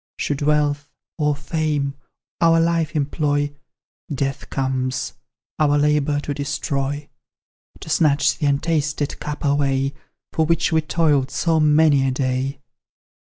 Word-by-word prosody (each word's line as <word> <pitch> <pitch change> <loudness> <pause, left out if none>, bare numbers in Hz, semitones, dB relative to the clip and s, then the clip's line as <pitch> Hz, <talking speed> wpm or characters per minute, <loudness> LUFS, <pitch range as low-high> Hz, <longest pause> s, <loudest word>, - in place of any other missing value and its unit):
Should 145 -1 -2
Wealth, 145 -1 +1 0.3
or 150 -1 +2
Fame, 145 -1 -1 0.5
our 165 -1 +5
Life 165 -1 +1
employ, 145 0 0 0.6
Death 135 -1 -3
comes, 130 -1 -2 0.5
our 145 -1 +3
labour 150 0 +2
to 145 - -3
destroy; 145 0 -2 0.7
To - - -9
snatch 150 -3 +3
the 150 - +1
untasted 150 0 0
cup 150 0 -5
away, 140 -1 +1 0.4
For 160 -1 +1
which 165 +1 +1
we 160 0 +3
toiled 150 -4 +1
so 160 +3 +1
many 150 -2 +4
a - - +2
day. 130 +1 -1
145 Hz, 120 wpm, -21 LUFS, 140-155 Hz, 0.7 s, our